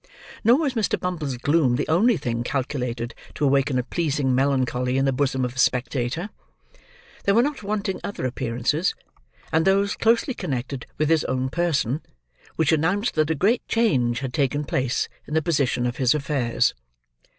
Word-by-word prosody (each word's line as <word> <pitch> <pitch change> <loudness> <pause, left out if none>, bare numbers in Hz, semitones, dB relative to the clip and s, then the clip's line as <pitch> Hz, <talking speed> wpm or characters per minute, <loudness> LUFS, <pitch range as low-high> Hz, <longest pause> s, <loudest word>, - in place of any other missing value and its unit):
Nor 235 +4 +6
was 290 -4 0
Mr. 225 -5 0
Bumble's 155 -8 -3
gloom 140 -1 +2
the - - -1
only 205 +7 +3
thing 120 -5 -2
calculated 125 -3 -3 0.2
to 145 - 0
awaken 135 -1 +2
a 125 - +1
pleasing 145 -2 0
melancholy 130 -1 +1
in 135 - +2
the 135 - +2
bosom 130 -1 0
of 125 +1 -5
a - - -6
spectator. 130 - 0 0.9
There 200 - +3
were 235 - +5
not 285 -2 -2
wanting 205 -2 -2
other 200 - -4
appearances, 130 - -1 0.6
and 160 +1 +3
those 195 +2 +2
closely 230 +4 +2
connected 130 - -4
with 155 0 +1
his 165 -2 +3
own 130 0 -1
person, 155 -4 0 0.5
which 160 -3 +2
announced 180 +8 +1
that 155 -1 +1
a 160 - +1
great 210 - +2
change 130 - +1
had 130 -2 -4
taken 145 0 0
place 130 -2 0 0.2
in 150 - -4
the - - +5
position 140 -7 +1
of 120 0 -2
his 130 +1 +3
affairs. 140 -5 +1
140 Hz, 170 wpm, -24 LUFS, 125-175 Hz, 0.9 s, Nor